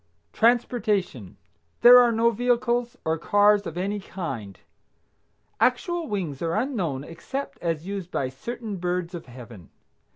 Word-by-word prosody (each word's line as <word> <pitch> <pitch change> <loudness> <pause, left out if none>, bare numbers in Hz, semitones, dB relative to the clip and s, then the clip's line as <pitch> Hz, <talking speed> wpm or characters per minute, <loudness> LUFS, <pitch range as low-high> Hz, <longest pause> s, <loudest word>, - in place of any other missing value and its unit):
TRANSPORTATION. 215 - 0 0.4
There 245 +1 +10
are 240 -1 +5
no 230 +1 +3
vehicles 240 +1 0
or 160 0 0
cars 205 +2 +3
of 165 - -7
any 200 +3 -2
kind. 130 - -6 1.0
Actual 330 +7 +1
wings 175 - -4
are 165 0 -1
unknown 195 - -2
except 265 - -6
as 165 -2 -2
used 195 -2 -5
by 135 -7 -1
certain 220 - -6
birds 180 0 -2
of 170 -5 -8
Heaven. 120 -7 -12
195 Hz, 130 wpm, -25 LUFS, 165-235 Hz, 1.0 s, There